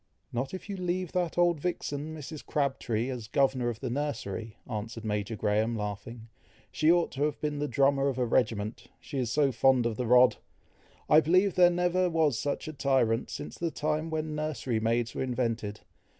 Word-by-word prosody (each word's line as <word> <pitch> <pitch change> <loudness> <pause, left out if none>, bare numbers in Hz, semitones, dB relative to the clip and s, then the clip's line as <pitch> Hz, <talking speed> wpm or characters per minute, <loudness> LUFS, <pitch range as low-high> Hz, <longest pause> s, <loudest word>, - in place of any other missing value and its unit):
"Not 125 +3 -2
if 185 - -7
you 200 -2 -4
leave 180 -1 -2
that 175 -2 -1
old 175 -2 +3
vixen, 155 -2 -3
Mrs. 150 +1 -8
Crabtree, 130 -5 -1
as 120 -4 -6
governor 130 -1 +1
of 115 -2 -6
the 130 - -2
nursery," 115 -6 -4
answered 110 0 -5
Major 105 +1 -2
Graham, 110 +3 +1
laughing. 105 +2 -5 0.4
"She 155 +1 +3
ought 175 -1 +2
to 135 - -6
have 150 -1 -2
been 150 -1 -2
the 150 - -1
drummer 140 -1 +2
of 135 -3 -1
a 125 - +1
regiment, 115 -3 0
she 140 - -5
is 125 -3 -1
so 140 +1 +3
fond 130 0 +3
of 115 -2 -1
the 125 - -2
rod! 125 +1 +6 0.7
I 150 - +7
believe 185 +5 +3
there 180 -1 +6
never 180 +1 +1
was 155 -7 +2
such 145 +1 -2
a 155 - -5
tyrant 130 -5 +1
since 145 - -7
the 170 - 0
time 155 +1 -2
when 155 -1 -2
nursery 150 -6 -2
maids 115 +1 0
were - - -4
invented. 115 -5 -2
135 Hz, 190 wpm, -29 LUFS, 115-155 Hz, 0.7 s, I